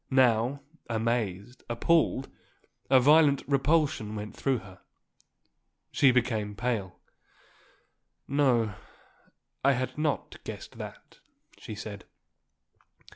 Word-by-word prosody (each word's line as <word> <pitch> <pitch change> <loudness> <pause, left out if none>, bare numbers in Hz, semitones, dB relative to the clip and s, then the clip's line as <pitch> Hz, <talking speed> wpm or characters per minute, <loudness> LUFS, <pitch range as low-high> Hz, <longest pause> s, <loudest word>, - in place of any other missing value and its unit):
Now, 130 +1 +3 0.3
amazed, 115 -1 -2
appalled, 135 +2 +2 0.6
a 130 - +7
violent 145 +1 +5
repulsion 140 -6 +1
went 105 0 -6
through 135 -2 0
her. 95 -4 -13 1.1
She 140 - +5
became 115 -5 0
pale. 110 -6 -2 1.3
"No. 125 -6 +2 0.9
I 140 +1 +5
had 130 +3 -3
not 150 -2 -2
guessed - - -9
that," - - -10 0.4
she 110 - -7
said. 105 -1 -8
125 Hz, 90 wpm, -28 LUFS, 110-140 Hz, 1.3 s, a